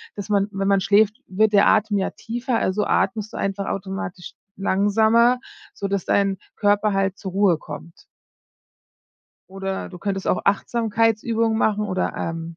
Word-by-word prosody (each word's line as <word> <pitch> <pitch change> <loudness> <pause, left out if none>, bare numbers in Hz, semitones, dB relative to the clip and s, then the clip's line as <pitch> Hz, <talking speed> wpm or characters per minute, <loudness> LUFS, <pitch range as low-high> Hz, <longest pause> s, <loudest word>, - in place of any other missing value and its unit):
dass 205 +1 -7
man 200 -1 +2
wenn 195 -1 -2
man 200 -1 +4
schläft, 210 +4 +3
wird 210 +3 +2
der 200 0 +5
Atem 215 -1 +3
ja 190 - -1
tiefer, 240 +2 -3
also, 205 +3 0
atmest 210 +2 0
du - - -6
einfach 195 0 -2
automatisch 190 -2 -5 0.2
langsamer, 220 +5 +3 0.3
sodass 200 -2 -3
dein 195 -1 +1 0.2
Körper 205 0 +2
halt 195 0 0
zur 190 -3 -6
Ruhe 195 -3 +3
kommt. 165 +1 -10 1.5
Oder 195 0 -4
du 180 - -11
könntest 195 0 -3
auch - - +1
Achtsamkeitsübungen 225 +1 +1
machen 210 -2 +1
oder, 185 -3 -2
ähm, 165 0 -5
200 Hz, 150 wpm, -22 LUFS, 195-215 Hz, 1.5 s, der